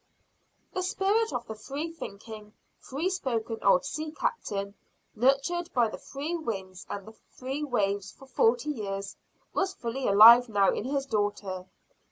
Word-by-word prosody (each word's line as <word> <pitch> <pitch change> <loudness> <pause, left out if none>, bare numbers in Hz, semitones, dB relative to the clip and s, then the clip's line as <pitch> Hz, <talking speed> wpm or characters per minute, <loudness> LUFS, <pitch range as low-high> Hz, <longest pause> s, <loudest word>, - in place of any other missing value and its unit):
The 370 - -1
spirit 400 +4 +1
of 240 - -3
the 220 - -6
free 285 +9 -5
thinking, 210 -6 -9 0.3
free 290 +7 -3
spoken 235 -11 -2
old 190 -2 +4
sea 310 0 -4
captain 200 - -3 0.4
nurtured 275 +9 +1
by 235 -3 +4
the - - -8
free 295 +5 -4
winds 195 - -5
and 200 -1 -5
the 220 - -10 0.2
free 270 +3 -3
waves 200 -7 -1
for 270 - -16
forty 250 +2 +2
years 200 -6 -4 0.4
was 385 0 0
fully 245 +2 -3
alive 230 +4 +9
now 200 -2 +3
in - - -3
his 275 +1 -1
daughter. 205 -5 -2
240 Hz, 150 wpm, -28 LUFS, 205-300 Hz, 0.4 s, alive